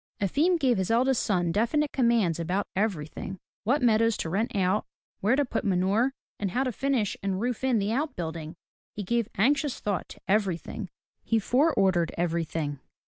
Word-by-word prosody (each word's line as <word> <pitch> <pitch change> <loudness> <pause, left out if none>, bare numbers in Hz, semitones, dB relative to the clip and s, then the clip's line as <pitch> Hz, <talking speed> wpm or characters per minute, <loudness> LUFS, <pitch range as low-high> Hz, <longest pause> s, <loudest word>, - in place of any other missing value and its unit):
Efim 300 - +2
gave 255 -9 +2
his 190 - -1
eldest 245 +2 +3
son 175 -4 +1
definite 255 - +1
commands 230 - +2
about 180 +5 -1
everything, 190 -2 -2
— - - -76
what 265 +5 +2
meadows 230 -1 +3
to 160 - -3
rent 215 +5 -1
out, 190 +2 +2 0.4
where 215 +6 +3
to 290 +1 +2
put - - -2
manure, 200 +6 +2 0.3
and 200 - -1
how 250 +8 0
to 255 - -1
finish 245 -4 0
and 190 -1 -1
roof 245 +2 -2
in 260 -3 +3
the 205 0 0
out 290 +6 -1
building. 160 -1 -5 0.4
He 205 - -4
gave 235 +3 0
anxious 275 +6 +2
thought 200 -3 -2
to - - -12
everything; 195 0 -1 0.3
he 225 - +1
fore 260 +9 +3
ordered 180 -4 +2
everything. 165 -4 -1
210 Hz, 180 wpm, -27 LUFS, 185-245 Hz, 0.4 s, eldest